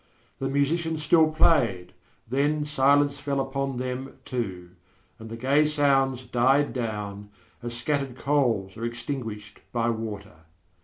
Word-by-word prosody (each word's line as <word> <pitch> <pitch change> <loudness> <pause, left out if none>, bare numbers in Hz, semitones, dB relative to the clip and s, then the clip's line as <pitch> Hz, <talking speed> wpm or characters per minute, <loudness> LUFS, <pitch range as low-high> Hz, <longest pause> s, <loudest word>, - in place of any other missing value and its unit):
The 135 - -1
musicians 155 +3 0
still 160 +1 +5
played; 120 - +2 0.3
then 145 +4 +1
silence 145 0 +3
fell 140 -1 -1
upon 135 -1 -2
them, 130 +1 -4
too, 95 -8 -4 0.5
and 110 0 -9
the 115 - -6
gay 135 +5 +3
sounds 135 -4 +2
died 130 +4 +2
down, 105 -4 -4 0.3
as 120 0 -5
scattered 135 0 -1
coals 120 -9 0
are 115 - -6
extinguished 120 -3 -5
by 120 -1 +1
water. 105 -6 -6
130 Hz, 125 wpm, -26 LUFS, 115-145 Hz, 0.5 s, still